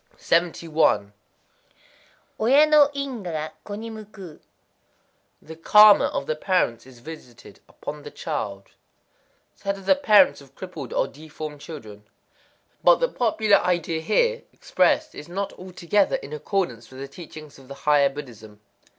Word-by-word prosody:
71.—Oya 165 - -1
no 300 -2 +5
ingwa 255 -10 -4
ga 155 0 -4
ko 205 - -7
ni 225 +2 -7
mukuü. 210 -6 -11 1.0
The 160 - -10
karma 210 +5 +7
of 140 - -3
the 155 - -2
parents 155 - -1
is 130 -2 -15
visited 125 -2 -12
upon 150 0 -8
the 145 - -9
child. 105 -12 -5 0.8
Said 200 0 -4
of 195 - -13
the 285 - +6
parents 275 -2 +4
of - - -19
crippled - - -8
or - - 0
deformed 155 -1 -9
children. 110 -11 -10 0.8
But - - +7
the - - 0
popular 220 -3 +2
idea 170 -2 -1
here 475 - +1
expressed 310 0 +1
is 150 - -10
not 195 +2 -4
altogether 185 +2 0
in 145 - -7
accord 180 +5 -1
with 115 -1 -14
the 135 +1 -8
teachings 155 -1 -12
of 135 - -17
the 140 - -9
higher 145 -1 +3
Buddhism. 115 -7 -11
165 Hz, 140 wpm, -24 LUFS, 140-210 Hz, 1.0 s, karma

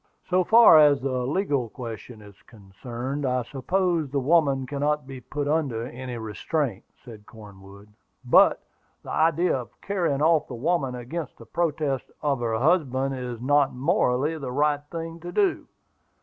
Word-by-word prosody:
"So 185 +1 +3
far 225 -5 +7
as 145 -2 +5
the 130 -2 -2
legal 140 - -1
question 115 -2 -9
is 100 -1 -16
concerned, 120 +6 -7
I 125 -2 0
suppose 165 +4 -1
the 140 +1 -1
woman 140 -2 +2
cannot 145 +1 -1
be 130 -1 -9
put 145 +4 -4
under 140 -7 -1
any 125 0 -7
restraint," 110 - -3 0.2
said 110 -4 -12
Cornwood; 100 -2 -14 0.4
"but - - +5 0.4
the - - -8
idea 165 +2 +2
of 125 -3 -7
carrying 170 -8 -1
off 160 -1 +3
the 125 - -7
woman 135 0 -1
against 130 +5 -6
the 115 - -13
protest 150 -3 -2
of 140 -3 0
her 115 -2 -1
husband, 135 -2 +1
is 125 -3 -5
not, 145 +1 +2
morally, 145 0 +1
the 130 -3 -5
right 145 +2 +1
thing 165 0 -6
to 175 +1 -8
do. 395 -3 0
135 Hz, 155 wpm, -25 LUFS, 125-155 Hz, 0.4 s, far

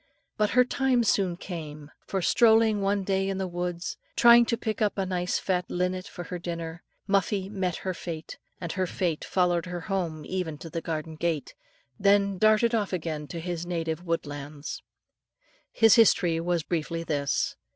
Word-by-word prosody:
But 210 -1 +1
her 250 - +7
time 255 -1 +2
soon 190 -5 +1
came, 155 -5 -7 0.2
for 190 -2 -2
strolling 220 -1 +4
one 200 0 +1
day 195 0 0
in 195 - -2
the 190 - -1
woods, 175 0 -4 0.2
trying 235 -1 +7
to 235 - 0
pick 220 -2 -3
up 210 -1 +1
a 195 - 0
nice 180 -1 -1
fat 180 -2 -1
linnet 180 +1 -1
for 175 - -7
her 180 +1 -6
dinner, 170 -1 -5 0.3
Muffie 195 -1 +1
met 190 -4 -2
her 185 - 0
fate, 165 -2 -7 0.2
and 170 -2 -4
her 185 -1 -1
fate 170 -3 -2
followed 175 -2 +1
her 175 -1 -4
home 165 -5 -3
even 180 -5 -3
to 165 +2 -9
the 165 - -3
garden 160 -1 -4
gate, 165 -3 -2 0.5
then 200 -1 +3
darted 215 +3 +4
off 215 -4 0
again 155 -4 -3
to 170 - -6
his 175 0 -4
native 165 -1 -2
woodland. 145 -3 -4 1.1
His 225 -1 +6
history 180 -7 +4
was 170 -1 0
briefly 165 0 -2
this. 145 -4 -1
180 Hz, 170 wpm, -27 LUFS, 165-200 Hz, 1.1 s, her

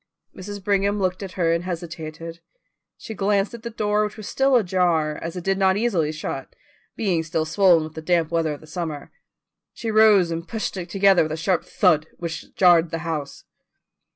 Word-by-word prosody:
Mrs. 200 +1 -8
Brigham 200 +1 +1
looked 185 -1 -1
at 190 -2 -7
her 165 -3 +1
and 170 +1 -1
hesitated. 165 -1 -6 0.6
She 220 - -8
glanced 200 +1 0
at 235 - -8
the 235 - -5
door, 210 -1 0
which 210 +2 -4
was 215 - -8
still 270 0 +2
ajar, 175 -7 +1
as 165 +1 -5
it 180 - -5
did 195 +1 0
not 190 0 +3
easily 190 -9 0
shut, 155 -3 -6 0.4
being 185 -7 0
still 155 0 -2
swollen 175 -1 +4
with 155 0 -8
the 160 - -7
damp 165 -1 +1
weather 165 -2 0
of 145 - -10
the - - -14
summer. 155 -2 -6 0.6
She 225 -1 -4
rose 210 -5 +5
and 165 +1 -4
pushed 220 -3 -4
it 180 -1 -6
together 195 -1 +4
with 155 0 -1
a - - -4
sharp 180 +1 0
thud 160 -6 +2
which 165 -2 -6
jarred 175 -3 +5
the 165 - -3
house. 150 -4 -4
180 Hz, 195 wpm, -23 LUFS, 160-200 Hz, 0.6 s, rose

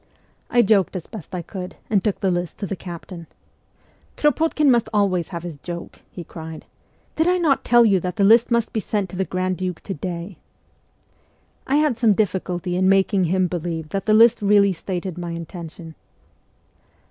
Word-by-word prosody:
I 240 -1 +4
joked 200 -3 +2
as' 180 - -4
best 195 -4 -9
I 175 - -4
could, 180 +1 -7
and 200 -3 +1
took 210 -3 -1
the 190 - +2
list 175 -1 -3
to 205 - -4
the 195 - -4
captain. 175 -1 -9 0.5
' - - -36
Krop6tkin 300 +1 +2
must 240 -3 +3
always 195 -5 +1
have 170 -2 -6
his 170 -4 -7
joke! 170 +3 -8
' - - -40
he 175 - -8
cried. 160 -1 -9 0.3
' - - -38
Did 320 +1 +2
I 365 0 +3
not 315 -6 +2
tell 240 0 +5
you 195 -4 +4
that 180 +1 -4
the 205 - +1
list 225 +4 +6
must 235 -2 0
be 220 - 0
sent 205 -4 -2
to - - -8
the 190 +1 -1
grand 185 0 -2
duke 185 -2 -4
to 195 - -5
day? 175 +2 -6 0.6
' - - -37
I 270 - +1
had 295 -6 +2
some 225 -3 +4
difficulty 180 -3 -1
in 185 +1 +3
making 195 0 +3
him 185 +2 +1
believe 165 -2 -4
that 195 +4 -4
the 215 - +5
list 230 +1 +6
really 200 -1 +4
stated 180 0 -5
my 170 -1 -4
intention. 170 -1 -8
190 Hz, 200 wpm, -22 LUFS, 175-215 Hz, 0.6 s, list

